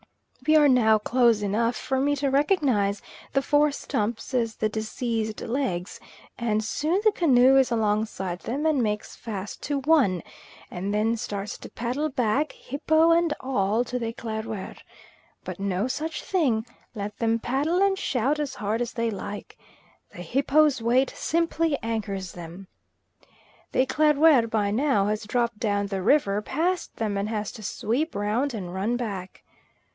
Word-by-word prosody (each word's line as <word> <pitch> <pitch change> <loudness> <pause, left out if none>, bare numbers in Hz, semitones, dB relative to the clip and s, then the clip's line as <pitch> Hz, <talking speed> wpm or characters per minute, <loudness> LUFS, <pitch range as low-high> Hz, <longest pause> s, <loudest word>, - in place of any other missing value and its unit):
We 310 - +5
are 300 -1 +7
now 225 -5 +5
close 230 -1 +2
enough 230 +4 +1
even - - -7
for 265 -1 0
me 290 +2 +2
to 280 -1 -1
recognise 265 - +2 0.3
the 275 - +1
four 295 +1 +3
stumps 225 -2 -3
as 230 -3 0
the 215 - 0
deceased's 220 0 -3
legs, 225 -8 -2 0.4
and 220 -2 0
soon 310 - 0
the 430 - +5
canoe 270 -7 +5
is 265 -1 +4
alongside 210 -5 -1
them 275 +10 -3
and 305 -5 +3
makes 210 -2 -2
fast 205 -3 -6
to 285 -1 -1
one, 260 - +3 0.5
and 190 +3 -3
then 215 +2 +1
starts 205 -2 -5
to - - -10
paddle 255 +6 -2
back, 260 +3 0
hippo 315 +4 +2
and 335 -2 +3
all, 225 -3 0
to 250 +1 -4
the 230 - -2
Eclaireur. 220 -3 -5 0.7
But - - -7
no 195 +2 -1
such 310 +4 -4
thing; 260 - +1 0.3
let 210 0 -5
them 230 0 +2
paddle 280 +9 0
and 395 0 +3
shout 275 -1 0
as 295 -2 -3
hard 215 +2 -2
as 240 - -3
they 230 -1 -1
like, 205 0 -7 0.6
the 175 - -8
hippo's 275 - +2
weight 250 +3 +2
simply 330 -2 0
anchors 200 -5 -3
them. 175 +2 -10 1.0
The 255 - +3
Eclaireur 295 -3 +4
by 210 -2 0
now 235 -3 +2
has 210 +1 -2
dropped 235 -1 0
down 205 -3 0
the 195 -1 -3
river 205 -3 +3
past 340 - -2
them, 215 -3 -2
and 200 +1 -1
has 215 -2 -3
to 215 - -11
sweep 250 - -2
round 225 +6 0
and 180 -4 -6
run 205 +6 -1
back. 200 -6 -6
230 Hz, 160 wpm, -25 LUFS, 210-280 Hz, 1.0 s, are